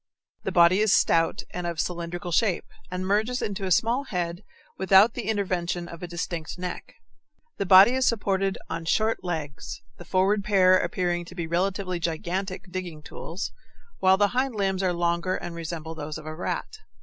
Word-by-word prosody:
The - - -3
body 175 +2 +5
is 215 -1 +3
stout 165 -4 +3
and 180 -1 -3
of 170 -2 -4
cylindrical 175 +2 -3
shape, 190 0 +1 0.2
and 185 +1 -3
merges 215 +6 +1
into 200 -1 -3
a 185 - -2
small 235 +9 +2
head 175 -3 -3 0.3
without 190 +4 +5
the 230 -4 -4
intervention 180 -4 -1
of 170 -1 -10
a 180 - -5
distinct 170 -1 -4
neck. 180 0 -6 0.6
The 200 - -2
body 190 +4 +9
is 260 0 +2
supported 195 -3 +1
on 165 0 -5
short 220 +6 +1
legs; 155 -5 -5 0.2
the - - -8
forward 195 +3 +2
pair 190 -2 +5
appear 180 -3 0
to 175 +1 -12
be 170 -2 -3
relatively 185 +2 -1
gigantic 185 +3 -3
digging 175 -5 -5
tools, 170 +5 -6 0.5
while 190 0 +5
the 205 0 +3
hind 255 +1 0
limbs 195 -2 0
are 185 -2 +2
longer 170 +1 0
and 175 - -5
resemble 165 -1 -5
those 155 -1 -6
of 155 - -10
the 155 - -5
rat. 305 - -4
185 Hz, 175 wpm, -26 LUFS, 170-195 Hz, 0.6 s, body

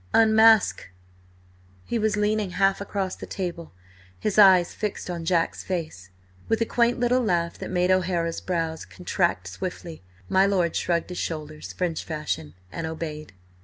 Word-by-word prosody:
Unmask!" 220 - +5 1.0
He 235 - -1
was 215 -1 +1
leaning 210 -1 +1
half 195 0 +2
across 195 -2 -3
the - - -9
table, 175 -3 -5 0.5
his 215 0 0
eyes 185 -4 +6
fixed 210 -3 -4
on 170 -2 -5
Jack's 170 -1 0
face. 160 - -5 0.4
With 225 - +2
a 230 - +2
quaint 240 +1 +1
little 245 +1 +2
laugh 170 -5 0
that - - -6
made 180 0 +1
O'Hara's 175 -3 0
brows 165 -3 -2
contract 175 - -1
swiftly, 170 - -6 0.3
my 190 - +4
lord 180 -4 +1
shrugged 170 0 0
his 180 - -5
shoulders 155 -1 -5
French 175 -3 -2
fashion 150 - -4 0.2
and 165 +6 -4
obeyed. 155 - -6
180 Hz, 150 wpm, -25 LUFS, 165-200 Hz, 1.0 s, eyes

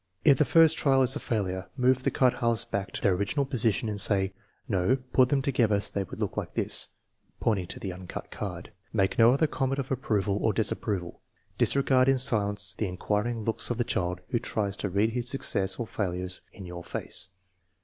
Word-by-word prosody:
If 140 -4 +6
the 150 - +4
first 165 +2 +5
trial 135 -2 +4
is 130 +2 +1
a - - -2
failure, 95 -7 -2
move 130 0 +3
the - - +1
cut 130 -2 +3
halves 115 -1 +2
back 100 -4 -3
to - - -3
their 100 - +4
original 100 +10 0
position 115 -4 +1
and 105 -2 +1
say: 95 -1 +2 0.2
" - - -41
No; 95 +7 +2 0.2
put 130 -1 +5
them 140 -2 +1
together 115 -7 +2
so - - +1
they 100 - 0
will - - -9
look - - -3
like - - -4
this - - -1 0.3
" - - -42
(pointing 100 -6 0
to - - -6
the 95 -2 -4
uncut 90 0 -8
card). - - -6 0.2
Make 95 +3 0
no 115 +1 +7
other 140 +5 +3
comment 135 -2 -1
of 135 -1 -4
approval 105 -6 0
or 110 - +2
dis 110 -2 0
approval. 90 -5 -4 0.4
Disregard 135 -1 +3
in 135 - +4
silence 105 -6 +2
the 105 - -2
inquiring 105 +5 -2
looks 115 +1 -1
of 120 - -1
the 120 - +1
child 90 -5 -2
who 120 - 0
tries 100 -3 -2
to 100 - -3
read 100 +4 +1
his 120 0 -3
success 95 -8 0
or 120 - -4
failure 90 -5 -3 0.2
in 95 - -11
your 85 -1 -8
face. 85 - -4
110 Hz, 215 wpm, -28 LUFS, 100-130 Hz, 0.4 s, no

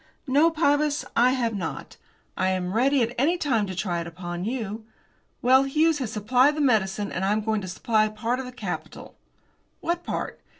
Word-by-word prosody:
"No, 290 +4 +4
Pybus, 300 -2 +1
I 250 +2 +4
have 235 -3 0
not. 180 -5 -5 0.4
I 185 - +1
am 185 -1 -2
ready 260 +3 +3
at 230 +1 -2
any 325 +7 +2
time 235 -11 0
to 190 - -5
try 175 -2 -2
it 170 - -6
upon 175 +1 -6
you. 225 -2 -4 0.6
Well, 260 +2 +6
Hughes 310 +3 +2
has 245 -5 -3
supplied 250 +7 +3
the - - -4
medicine, 210 -7 +1
and 185 - -3
I 195 - +2
am 215 +1 +1
going 215 -1 -1
to 185 - -6
supply 215 +4 +1
part 230 +4 -2
of 265 - -4
the 250 - -8
capital." 250 - -6 0.7
"What 345 +1 -2
part?" - - -4
230 Hz, 195 wpm, -25 LUFS, 200-275 Hz, 0.7 s, Well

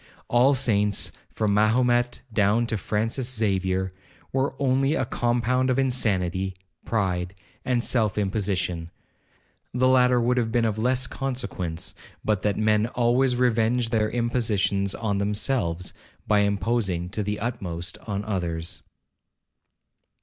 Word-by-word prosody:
All 125 +4 +4
saints, 105 -6 +1 0.2
from 105 -2 0
Mahomet 120 +3 +2
down 105 +2 +3
to 115 - -2
Francis 115 +6 -1
Xavier, 95 -3 0 0.4
were 135 +1 0
only 135 +2 +2
a 130 - 0
compound 120 +1 +1
of 130 - +2
insanity, 95 -8 0 0.3
pride, 95 -4 -1 0.3
and 125 -2 0
self 110 -6 +1
imposition;—the 95 +4 -3
latter 125 -1 +5
would 125 +1 +1
have 115 -2 +1
been 115 0 +2
of 110 -1 -1
less 125 +2 +1
consequence, 100 -11 -4 0.3
but 105 -3 +1
that 105 -1 0
men 110 0 +2
always 125 +2 +2
revenge 120 -1 +1
their 110 -2 +2
impositions 110 -5 0
on 100 -3 -1
themselves, 100 -4 -1 0.3
by 105 -1 +3
imposing 100 -3 0
to 105 +3 -3
the 105 +1 -2
utmost 90 -7 -4
on 100 -1 -3
others.' 85 -5 -3
110 Hz, 120 wpm, -25 LUFS, 100-125 Hz, 0.4 s, latter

